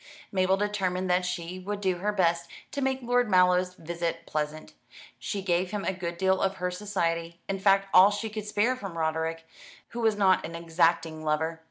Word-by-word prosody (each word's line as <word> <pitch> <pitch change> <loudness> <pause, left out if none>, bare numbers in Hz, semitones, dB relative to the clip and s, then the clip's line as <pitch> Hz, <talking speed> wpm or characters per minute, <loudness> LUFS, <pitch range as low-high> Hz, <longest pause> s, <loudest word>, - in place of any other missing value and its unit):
Mabel 190 0 +2
determined 190 -3 -1
that 180 0 +2
she 180 +1 -4
would 200 +2 -4
do 190 -3 0
her 205 +4 -1
best 170 -4 +1 0.2
to 280 - -3
make 265 -1 -1
Lord 245 -1 +2
Mallow's 180 -1 +3
visit 170 0 -4
pleasant. 155 0 -4 0.5
She 200 -2 -4
gave 180 0 +1
him 205 0 -4
a 190 - 0
good 175 -2 -5
deal 190 +1 +2
of 195 0 +1
her 180 -1 -2
society, 170 -4 -2
in 195 0 -2
fact 195 0 +3
all 185 +2 +9
she 210 +2 -3
could 215 -1 -5
spare 210 +5 +1
from 195 -9 -7
Roderick, 160 0 -1 0.4
who 235 - -6
was 220 -2 +3
not 190 -2 +3
an 165 +1 -6
exacting 165 -1 +1
lover. 160 +1 -1
185 Hz, 190 wpm, -28 LUFS, 170-200 Hz, 0.5 s, all